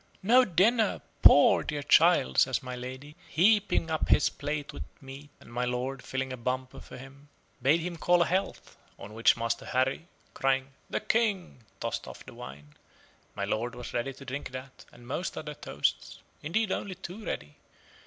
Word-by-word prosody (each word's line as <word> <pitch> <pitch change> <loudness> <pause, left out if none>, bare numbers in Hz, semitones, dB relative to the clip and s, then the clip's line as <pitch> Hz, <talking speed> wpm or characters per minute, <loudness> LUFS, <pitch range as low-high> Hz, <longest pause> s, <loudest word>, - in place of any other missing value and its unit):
"No 245 +6 +6
dinner! 215 +4 +2 0.2
poor 145 - +7
dear 145 -2 -4
child!" 65 - +4
says - - +2
my 125 0 -5
lady, 130 +4 -8
heaping 195 -2 +3
up 160 - -1
his - - +4
plate 145 0 -4
with - - -8 0.2
meat, 135 +2 -11
and 115 - -15
my 125 +1 -1
lord, 125 +2 -2
filling 130 0 -3
a - - -6
bumper 130 +2 -3
for 125 - -11
him, 135 +2 -13 0.3
bade 145 +7 +3
him 175 0 -4
call 175 +1 +4
a - - -2
health; 190 +4 -2 0.2
on 105 - -10
which 115 +2 +4
Master 115 0 -2
Harry, 135 +4 -1 0.3
crying 135 0 0 0.2
"The - - -2
King," 200 - -1
tossed - - -3
off - - -10
the - - -11
wine. 75 +3 -11 0.6
My - - -2
lord 120 +3 -2
was 125 -1 -8
ready 120 +3 -1
to 140 - -13
drink 140 +2 -5
that, 130 +1 -10
and 120 0 -16
most 155 +8 -4
other 150 -1 -5
toasts: 70 - -2 0.2
indeed 195 +7 0
only 190 -1 -3
too 190 +3 -9
ready. 75 - -5
135 Hz, 175 wpm, -29 LUFS, 125-170 Hz, 0.6 s, poor